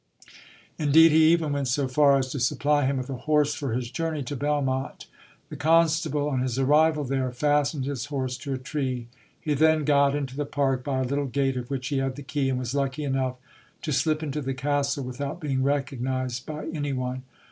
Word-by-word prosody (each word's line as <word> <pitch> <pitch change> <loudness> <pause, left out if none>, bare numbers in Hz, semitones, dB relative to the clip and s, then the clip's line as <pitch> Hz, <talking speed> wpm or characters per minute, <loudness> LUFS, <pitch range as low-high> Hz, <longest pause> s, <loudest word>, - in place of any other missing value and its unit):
Indeed, 160 +2 +6
he 160 +1 +6
even 160 -4 +1
went 140 -1 -1
so 135 +2 0
far 140 +1 +4
as 130 -1 -2
to 140 - -3
supply 145 +3 +1
him 135 0 0
with 130 -1 -4
a 135 +3 -7
horse 150 -1 +3
for 140 -4 -4
his 120 0 -3
journey 160 -3 -2
to 135 +3 -5
Belmonte. 140 -1 -1 0.4
The - - -7
constable 160 -2 +2
on 130 -3 0
his 130 -1 -2
arrival 150 +3 +3
there 130 -1 -1
fastened 145 +1 +1
his 135 -2 -3
horse 130 -3 -3
to 140 -3 -4
a - - -3
tree. 130 -3 -3 0.3
He 150 - -1
then 155 +1 +3
got 140 -1 +3
into 135 -3 -3
the 145 +1 -2
park 135 -3 0
by 135 -2 -1
a - - 0
little 140 +2 -1
gate 135 0 0
of 125 -1 -5
which 135 -2 -3
he 140 -2 0
had 135 -1 -2
the 145 - -8
key, 135 -1 -1
and 130 - 0
was 125 0 -3
lucky 140 +1 -1
enough 135 -2 -1 0.5
to 155 - -1
slip 155 +3 +1
into 150 0 -3
the 135 -1 -3
castle 140 +1 0
without 140 +5 -5
being 140 -5 -1
recognized 130 -2 -2
by 155 -1 -5
any 145 -3 -3
one. 130 0 -3
140 Hz, 210 wpm, -26 LUFS, 130-150 Hz, 0.5 s, Indeed